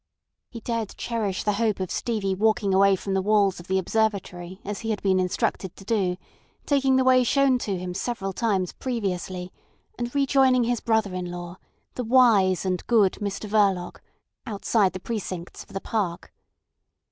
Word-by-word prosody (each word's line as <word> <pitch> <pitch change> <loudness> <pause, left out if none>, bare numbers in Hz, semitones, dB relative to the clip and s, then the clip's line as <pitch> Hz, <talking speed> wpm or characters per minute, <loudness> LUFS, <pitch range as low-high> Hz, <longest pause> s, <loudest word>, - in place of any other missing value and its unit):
He 230 - -9
dared 230 -3 -3
cherish 215 -5 -2
the 210 - +2
hope 215 -3 +1
of 185 -2 -3
Stevie 210 -5 -1
walking 205 0 +1
away 195 +1 +5
from 195 +1 -4
the 190 - +1
walls 200 -2 +2
of 175 - -12
the 190 - +1
Observatory 190 -3 -1
as 205 0 -4
he 225 - -5
had 215 -2 -1
been 190 -1 +3
instructed 185 0 -1
to 195 - -14
do, 190 -5 0 0.5
taking 270 -2 +2
the 260 - +4
way 255 0 +5
shown 270 +1 +3
to 200 -5 -2
him 180 0 -5
several 195 -1 -3
times 195 -5 0
previously, 185 -6 -4 0.5
and 240 +2 -4
rejoining 265 -2 +4
his 240 0 0
brother 220 -4 0
in 180 -1 -4
law, 175 0 -7 0.4
the 250 - -3
wise 220 -7 +4
and 185 -1 -1
good 215 -6 +3
Mr 200 +1 -3
Verloc, 200 -4 +1 0.5
outside 205 -2 +1
the 185 - -5
precincts 185 -5 -5
of - - -14
the 195 - -3
park. 190 -5 -3
200 Hz, 170 wpm, -25 LUFS, 185-230 Hz, 0.5 s, away